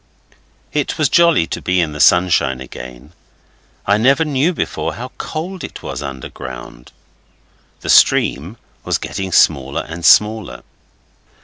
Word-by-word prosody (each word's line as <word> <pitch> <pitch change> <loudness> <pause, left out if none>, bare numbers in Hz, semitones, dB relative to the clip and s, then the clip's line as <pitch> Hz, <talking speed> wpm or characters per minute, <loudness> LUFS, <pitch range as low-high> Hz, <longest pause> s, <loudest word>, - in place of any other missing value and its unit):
It 150 -2 -1
was 155 -3 +2
jolly 170 - +4
to - - -6
be 90 0 0
in 85 -3 0
the 75 - -8
sunshine 85 -8 +3
again. 65 +3 -11 0.7
I 100 +1 +3
never 135 +7 +3
knew 150 +3 +1
before 175 - -3
how 125 +2 -7
cold 175 +4 -5
it - - -9
was - - -5
underground. 65 -3 -9 0.9
The - - -7
stream 85 +11 +3 0.3
was - - 0
getting 95 -1 -5
smaller 70 -5 +2
and 85 +1 -8
smaller. 105 - +3
90 Hz, 130 wpm, -17 LUFS, -, 0.9 s, jolly